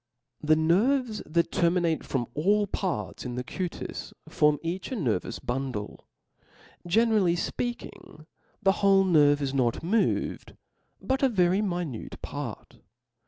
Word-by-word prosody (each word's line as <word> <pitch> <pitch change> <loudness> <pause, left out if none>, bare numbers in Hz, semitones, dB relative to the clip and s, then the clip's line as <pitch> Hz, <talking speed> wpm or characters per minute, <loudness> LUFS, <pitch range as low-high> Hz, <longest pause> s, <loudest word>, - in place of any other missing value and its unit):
The 155 +1 +4
nerves 215 - +2
that 170 +2 +1
terminate 170 -2 +1
from 130 -3 -2
all 205 +7 +2
parts 180 - -3
in 125 -1 -5
the 125 - -3
cutis, 175 +8 -5
form 150 0 +3
each 175 +7 -4
a - - -2
nervous 120 - -1
bundle; 125 -4 -5 0.8
generally 210 -2 +3
fpeaking, 175 -6 -5 0.4
the 195 - +5
whole 195 -1 +5
nerve 145 -5 +4
is 135 -1 -2
not 125 -1 0
moved, 210 +6 0 0.4
but 265 0 -1
a 270 - +4
very 185 -2 +2
minute 175 - -4
part. - - -7
170 Hz, 125 wpm, -27 LUFS, 145-200 Hz, 0.8 s, the